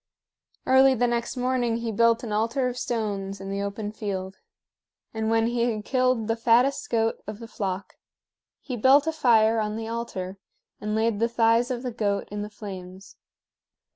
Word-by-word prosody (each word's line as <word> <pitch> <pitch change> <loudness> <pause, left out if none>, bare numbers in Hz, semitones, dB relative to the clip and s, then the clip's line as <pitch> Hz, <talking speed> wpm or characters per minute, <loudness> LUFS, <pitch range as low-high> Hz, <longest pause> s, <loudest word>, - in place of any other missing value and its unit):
Early 265 0 +6
the 245 0 +2
next 235 +1 -1
morning 250 -2 0
he 230 -1 -3
built 230 +2 +3
an 225 - -5
altar 230 +5 0
of 250 - -3
stones 200 -5 -3
in 195 0 -6
the 200 0 -2
open 205 +1 -4
field; 195 -3 -5 0.8
and 220 0 -1
when 225 0 +3
he 240 +1 +1
had 215 -2 -4
killed 255 -4 +1
the 225 - +1
fattest 240 +4 +2
goat 225 -1 0
of 210 -1 -5
the 230 +1 -9
flock, 195 -4 -4 0.6
he 255 - -5
built 265 +5 +5
a 320 - +1
fire 230 -7 +4
on 210 0 -2
the 225 0 -5
altar 195 -5 -5 0.4
and 210 0 -2
laid 220 -1 +1
the 230 +1 +2
thighs 230 +1 +3
of 250 -1 -3
the 250 - -3
goat 205 -3 -1
in 205 0 -4
the 210 - -5
flames. 190 -2 -9
225 Hz, 180 wpm, -25 LUFS, 210-240 Hz, 0.8 s, Early